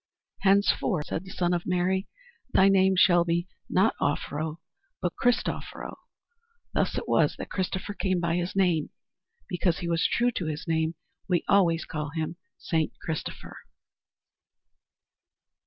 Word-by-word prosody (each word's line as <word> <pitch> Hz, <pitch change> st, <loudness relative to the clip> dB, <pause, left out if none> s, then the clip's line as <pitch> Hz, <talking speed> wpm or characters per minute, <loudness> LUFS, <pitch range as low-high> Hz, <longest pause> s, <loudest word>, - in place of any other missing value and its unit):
"Henceforth," 195 Hz, -6 st, +2 dB
said 185 Hz, -, -3 dB
the -, -, -10 dB
Son 180 Hz, -1 st, 0 dB
of 175 Hz, -1 st, -2 dB
Mary, 185 Hz, +2 st, +1 dB, 0.5 s
"thy 190 Hz, +1 st, +6 dB
name 190 Hz, -1 st, +4 dB
shall 175 Hz, -2 st, +6 dB
be, 170 Hz, +1 st, 0 dB, 0.2 s
not 190 Hz, +5 st, +3 dB
Offero 155 Hz, +2 st, -1 dB, 0.4 s
but 180 Hz, -, -1 dB
Christoffero." 245 Hz, -1 st, -1 dB, 0.8 s
Thus -, -, 0 dB
it -, -, -3 dB
was -, -, +3 dB
that -, -, -7 dB
Christopher 190 Hz, +2 st, -2 dB
came 185 Hz, -1 st, 0 dB
by 170 Hz, -1 st, 0 dB
his 175 Hz, +1 st, -2 dB
name. 180 Hz, -6 st, +2 dB, 0.6 s
Because 175 Hz, -1 st, 0 dB
he 175 Hz, -, -4 dB
was 165 Hz, -1 st, +2 dB
true 245 Hz, +1 st, +2 dB
to 180 Hz, -8 st, -3 dB
his 155 Hz, +1 st, -4 dB
name 160 Hz, 0 st, 0 dB, 0.3 s
we 180 Hz, -3 st, +1 dB
always 170 Hz, -5 st, +3 dB
call 150 Hz, -1 st, -4 dB
him 160 Hz, +1 st, -3 dB, 0.2 s
St 160 Hz, -2 st, 0 dB
Christopher. 160 Hz, -2 st, -5 dB
175 Hz, 140 wpm, -27 LUFS, 165-190 Hz, 0.8 s, thy